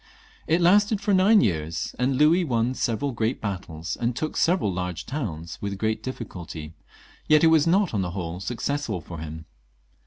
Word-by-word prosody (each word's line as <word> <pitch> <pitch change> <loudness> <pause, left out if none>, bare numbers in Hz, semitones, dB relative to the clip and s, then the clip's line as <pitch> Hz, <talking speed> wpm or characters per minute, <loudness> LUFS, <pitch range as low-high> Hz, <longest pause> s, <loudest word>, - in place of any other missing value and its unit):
It 165 +3 +2
lasted 205 +4 +4
for 205 0 0
nine 200 +3 +6
years, 80 - -1
and 130 +2 +1
Louis 160 +5 +5
won 120 -4 0
several 130 +3 -1
great 115 +1 -1
battles, 90 -6 -4
and 120 0 -1
took 155 +4 -3
several 165 - +2
large 90 -1 -4
towns, 85 - -5
with 100 -1 -3
great 110 +1 -1
difficulty; 85 - -7 0.5
yet 155 0 +5
it - - +7
was 160 0 +4
not 190 - +3
on 100 - +1
the 90 - -2
whole 90 -1 -5
successful 120 +1 -2
for 85 +1 -9
him. 80 0 -7
115 Hz, 175 wpm, -25 LUFS, -, 0.5 s, it